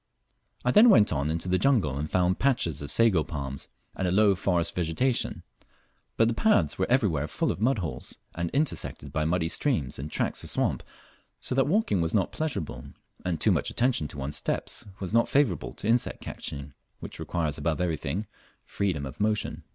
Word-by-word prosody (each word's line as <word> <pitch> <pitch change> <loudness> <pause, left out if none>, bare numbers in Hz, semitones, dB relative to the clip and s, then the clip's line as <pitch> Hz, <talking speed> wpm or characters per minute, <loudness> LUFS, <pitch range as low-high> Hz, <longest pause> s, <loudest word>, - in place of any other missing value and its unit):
I 125 - +4
then 225 - +7
went 105 - +5
on 70 0 -1
into 80 +3 -2
the 90 0 +2
jungle 110 - +2
and 75 +2 -3
found 90 +1 +1
patches 120 - +1
of 70 - -6
sago 110 -9 +3
palms 70 -3 -5 0.3
and 95 - -1
a - - +1
low 100 +1 +5
forest 85 -3 0
vegetation, 90 +10 -1 0.7
but 115 - +4
the 115 - +1
paths 95 - +2
were 95 - 0
everywhere 100 - +2
full - - -1
of - - -6
mud 125 +3 +3
holes, 85 -6 -5 0.2
and 85 0 -2
intersected 145 - -2
by 75 0 0
muddy 80 0 +1
streams 80 - 0
and 70 +3 -5
tracts - - -1
of - - -4
swamp, - - 0 0.6
so - - -1
that 135 +1 +2
walking 160 - +2
was 80 +3 0
not 100 -3 +1
pleasurable, 80 - -3 0.4
and 90 -3 -1
too - - +3
much - - +1
attention 120 - +1
to 70 - -11
one's 70 +1 -2
steps - - -2 0.2
was 95 +1 -5
not 115 0 +3
favourable 135 - +1
to - - -4
insect 120 +2 +2
catching, 70 0 -6 0.3
which - - -8
requires 80 -4 -2
above 80 +2 -1
everything 85 +2 -2 0.4
freedom 90 -8 -2
of 65 - -9
motion. 105 0 -1
90 Hz, 190 wpm, -27 LUFS, 75-115 Hz, 0.7 s, then